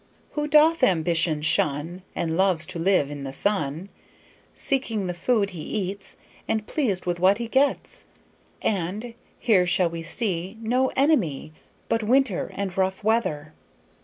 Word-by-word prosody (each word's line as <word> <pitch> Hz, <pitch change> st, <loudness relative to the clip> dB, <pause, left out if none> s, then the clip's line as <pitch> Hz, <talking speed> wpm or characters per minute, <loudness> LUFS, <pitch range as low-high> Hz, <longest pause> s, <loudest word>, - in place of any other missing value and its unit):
'Who 295 Hz, 0 st, -2 dB
doth 305 Hz, +2 st, +5 dB
ambition 165 Hz, -6 st, +2 dB
shun 155 Hz, +3 st, 0 dB
And 160 Hz, -1 st, -1 dB
loves 185 Hz, -3 st, +2 dB
to 185 Hz, -2 st, -6 dB
live 165 Hz, -5 st, +2 dB
i' -, -, -4 dB
the 140 Hz, -2 st, -6 dB
sun, 165 Hz, +1 st, -1 dB, 0.7 s
Seeking 230 Hz, -7 st, -1 dB
the 180 Hz, -, -2 dB
food 200 Hz, +3 st, +1 dB
he 170 Hz, -4 st, -7 dB
eats, 195 Hz, +2 st, -4 dB, 0.3 s
And 220 Hz, -1 st, -1 dB
pleased 215 Hz, -, -1 dB
with 175 Hz, -1 st, -1 dB
what 190 Hz, +3 st, +4 dB
he 235 Hz, 0 st, -4 dB
gets'; 270 Hz, +4 st, 0 dB, 0.6 s
and 205 Hz, +5 st, -2 dB, 0.2 s
'Here 190 Hz, -7 st, +3 dB
shall 175 Hz, 0 st, +2 dB
he 165 Hz, 0 st, -5 dB
see 185 Hz, +2 st, -3 dB
No 250 Hz, +4 st, +1 dB
enemy 205 Hz, -, +1 dB, 0.3 s
But 225 Hz, -, +1 dB
winter 235 Hz, -3 st, +1 dB
and 195 Hz, -2 st, -3 dB
rough 190 Hz, +1 st, -1 dB
weather.' 160 Hz, -9 st, 0 dB
190 Hz, 145 wpm, -25 LUFS, 170-225 Hz, 0.7 s, doth